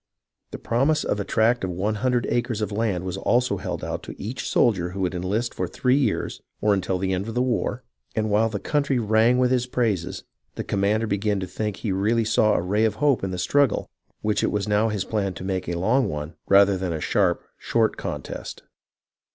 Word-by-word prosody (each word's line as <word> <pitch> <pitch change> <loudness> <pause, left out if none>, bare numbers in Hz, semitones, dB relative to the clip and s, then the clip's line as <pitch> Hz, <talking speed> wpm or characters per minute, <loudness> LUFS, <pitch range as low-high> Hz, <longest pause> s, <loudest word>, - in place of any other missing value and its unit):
The - - -6
promise 135 +7 +1
of 105 - -1
a - - 0
tract 115 +4 +2
of 95 - -1
one 95 +5 -1
hundred 125 -2 +1
acres 120 -2 0
of 105 0 -2
land 100 -4 -1
was 95 0 -4
also 120 0 +1
held - - -5
out - - -3
to - - -10
each 115 +6 -4
soldier 95 -8 +2
who 95 +2 -5
would 90 -1 0
enlist 100 +7 -1
for - - -2
three 125 0 +1
years 130 -7 0 0.2
or 105 0 +3
until 95 -1 0
the 95 +1 -1
end 95 +3 -2
of 115 - -5
the 125 - +2
war; 125 0 -1 0.3
and 110 -1 0
while 110 +2 +3
the 105 -2 -3
country 145 0 0
rang 110 +2 +3
with 125 0 +3
his 125 -1 +1
praises, 110 -9 -1 0.3
the - - -3
commander 100 +3 +1
began 100 -1 0
to - - -2
think 105 +2 -3
he 110 - -3
really 110 +4 +1
saw 110 -1 +3
a - - 0
ray 105 +4 +1
of 110 - +2
hope 140 -8 +2
in 95 - -1
the 90 - -4
struggle 135 +7 +1 0.3
which 105 -1 +1
it - - +1
was 105 0 -1
now 105 +2 +2
his 105 -3 -2
plan 100 -4 -1
to - - -7
make 95 -2 -2
a 85 - -2
long 125 +9 +2
one 75 +2 -5
rather 100 0 +5
than 90 -2 -2
a 80 - -3
sharp, 90 +2 +1 0.2
short - - +1
contest. - - -6
105 Hz, 220 wpm, -24 LUFS, 95-120 Hz, 0.3 s, rather